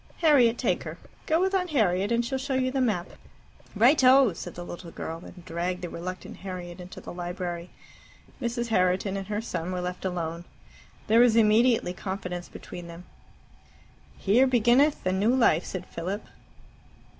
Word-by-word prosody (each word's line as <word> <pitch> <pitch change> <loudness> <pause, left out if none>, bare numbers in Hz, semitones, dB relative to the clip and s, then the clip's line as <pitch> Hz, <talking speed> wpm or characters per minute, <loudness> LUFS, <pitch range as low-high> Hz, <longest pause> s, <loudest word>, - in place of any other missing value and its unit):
Harriet, 255 -8 +5
take - - 0
her. - - -7 0.3
Go 320 0 +3
with 380 +2 +1
Aunt 365 -2 +1
Harriet, 200 - +1
and 235 0 +2
she'll 265 +2 -2
show 265 0 -2
you 255 0 +1
the 265 0 0
map." 205 -8 0 0.6
"Righto!" 255 - +6
said - - -8
the 175 - -7
little 175 0 -8
girl, 165 +1 -6
and 180 -1 -13
dragged 180 +1 -3
the 175 - -3
reluctant 185 +2 -7
Harriet 180 -2 -7
into 180 +1 -10
the - - -9
library. 175 0 -5 0.7
Mrs. 240 -1 -2
Herriton 185 -1 +1
and 195 -1 -4
her 210 0 -2
son 180 -6 -4
were 180 - -2
left 180 0 -4
alone. 170 -2 -3 0.6
There 225 +2 +4
was 240 -2 +6
immediately 225 -2 +4
confidence 180 -2 -5
between 175 -1 -9
them. 170 +1 -10 1.1
"Here 235 +7 +4
beginneth 255 +4 +3
the 185 - +1
New 210 +6 +2
Life," 180 -10 +3
said 185 -1 -5
Philip. 190 +5 -5
195 Hz, 165 wpm, -27 LUFS, 180-240 Hz, 1.1 s, Righto